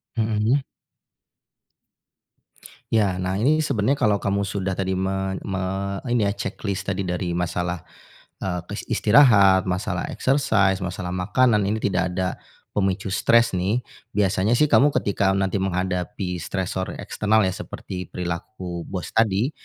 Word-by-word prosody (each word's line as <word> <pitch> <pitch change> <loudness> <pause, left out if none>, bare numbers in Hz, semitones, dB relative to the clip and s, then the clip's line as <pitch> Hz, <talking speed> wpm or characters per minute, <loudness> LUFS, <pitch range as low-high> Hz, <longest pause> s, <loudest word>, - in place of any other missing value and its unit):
Hmm. 110 +2 +2 2.3
Ya 100 -5 +2
nah 95 +1 -1
ini 145 +10 +3
sebenarnya 135 -2 +1
kalo 105 -1 +3
kamu 100 0 -1
sudah 95 0 -2
tadi, 95 0 -1
men 95 0 -2
me 95 -1 -3 0.5
ini 120 -3 +2
ya, 100 - +2
ceklis 100 -1 -4
tadi 100 0 -1
dari 90 -1 -2
masalah, 90 0 -2 0.6
eee, 90 -2 -1
kes 105 - -5
istirahat, 105 -6 +6
masalah 90 -1 -2
exercise, 105 -9 +2
masalah 90 0 -4
makanan 105 +4 +2
ini 105 +3 -1
tidak 90 -3 0
ada 90 0 -2 0.3
pemicu 95 -1 -1
stres 115 +4 +4
nih, 100 +7 0 0.3
biasanya 100 +2 +2
sih 150 +4 +3
kamu 145 +1 +5
ketika 100 -1 +1
nanti 95 0 0
menghadapi 90 -1 -2
stresor 95 +1 -3
eksternal 110 +1 +2
ya 95 - +2
seperti 90 0 -7
perilaku 90 0 -5
bos 90 -3 -5
tadi. 110 +3 +2
95 Hz, 130 wpm, -23 LUFS, 90-105 Hz, 2.3 s, istirahat